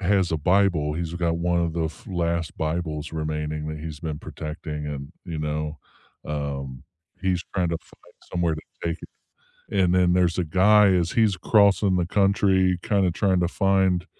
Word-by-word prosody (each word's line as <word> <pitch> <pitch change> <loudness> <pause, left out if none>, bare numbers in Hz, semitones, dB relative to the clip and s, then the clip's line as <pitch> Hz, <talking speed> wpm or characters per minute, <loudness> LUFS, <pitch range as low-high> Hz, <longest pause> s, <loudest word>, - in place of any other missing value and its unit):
has 95 -2 +2
a - - +2
Bible. 90 -3 +2
He's 85 0 -3
got 85 -1 0
one 85 +1 +1
of 85 -1 0
the 80 -2 -1 0.2
last 85 -2 -1
Bibles 80 -1 -3
remaining 75 -1 -3
that 75 0 -5
he's 75 -1 -7
been 80 -3 -4
protecting 75 -1 -6
and, 70 +1 -6
you 85 -3 -5
know, 75 0 -3 0.5
um, 70 -3 -4 0.4
he's 90 -2 0
trying 90 -3 +1
to 85 - -1
find - - -22 0.2
somewhere 85 -3 +1
to 75 - -7 0.2
take 85 0 -1
it. - - -9 0.6
And 90 -3 +2
then 90 -1 +4
there's 90 -2 +2
a 90 - +1
guy 100 +6 +5
as 90 -3 +2
he's 110 -4 +3
crossing 100 -1 +3
the 85 -2 0
country, 95 -2 +2
kinda 100 -4 +2
trying 95 -1 +1
to 85 - +1
find, 95 -2 +2
85 Hz, 175 wpm, -24 LUFS, 75-95 Hz, 0.6 s, guy